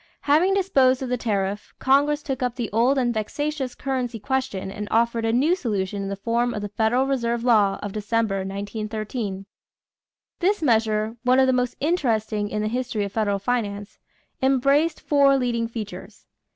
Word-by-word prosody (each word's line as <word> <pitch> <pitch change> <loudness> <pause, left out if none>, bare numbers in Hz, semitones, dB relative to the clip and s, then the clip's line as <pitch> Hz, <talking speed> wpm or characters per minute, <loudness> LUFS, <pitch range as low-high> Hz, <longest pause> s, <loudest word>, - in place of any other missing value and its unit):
Having 330 +7 +3
disposed 265 -9 +3
of 255 - -4
the 250 - +1
tariff, 205 -3 -2
Congress 290 +3 +2
took 270 -3 -4
up 250 -1 -1
the 240 -4 -4
old 240 +6 +3
and 245 -2 +1
vexatious 265 +4 -3
currency 255 -3 -3
question 235 -5 -2
and 210 +1 -6
offered 230 0 +1
a 225 - +2
new 285 +9 +3
solution 205 - -2
in 195 - -4
the 200 - -3
form 235 +4 -1
of 210 - -4
the 205 - -4
federal 225 +5 +1
reserve 235 -3 -1
law 210 -5 +3
of 205 - -4
December, 215 0 -1
1913. 205 +1 -4 0.9
This 380 0 +1
measure, 220 -3 +1
one 255 +1 +3
of 265 - +6
the 260 - +2
most 250 -1 0
interesting 220 -10 0
in 210 0 -2
the - - 0
history 235 -2 -2
of 200 - -4
federal 205 -2 0
finance, 205 -2 -3 0.4
embraced 275 +4 +2
four 280 -2 +4
leading 235 -3 0
features. 225 -3 -8
235 Hz, 170 wpm, -24 LUFS, 210-265 Hz, 0.9 s, of